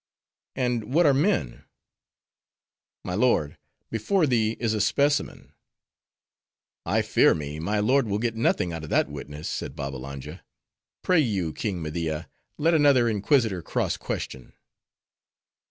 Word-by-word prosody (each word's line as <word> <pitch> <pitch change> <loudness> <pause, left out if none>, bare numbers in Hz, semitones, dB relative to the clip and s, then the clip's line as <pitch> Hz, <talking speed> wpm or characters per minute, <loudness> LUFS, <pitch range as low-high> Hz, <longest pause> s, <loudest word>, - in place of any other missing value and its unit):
"And 125 -1 -1
what 175 +1 +5
are 145 - +5
men?" 135 - 0 1.4
"My 90 - -3
lord, 90 - +1 0.3
before 155 - +1
thee 115 -4 +1
is 115 -2 0
a 105 - 0
specimen." 145 +6 0 1.3
"I - - +2
fear - - +4
me, 75 0 -5
my 105 +7 -1
lord 125 +4 +2
will 100 0 0
get 115 +1 -1
nothing 90 -6 +1
out 80 -1 -6
of 80 - -7
that - - +2
witness," 75 +2 -7
said - - -4
Babbalanja. 70 +3 -7 0.6
"Pray 180 -2 +3
you, 100 - 0
King 95 -6 -3
Media, 80 0 -3 0.3
let 165 +3 +2
another 140 -6 +5
inquisitor 110 - +1
cross 85 - -1
question." 65 -2 -6
105 Hz, 130 wpm, -25 LUFS, 80-130 Hz, 1.4 s, what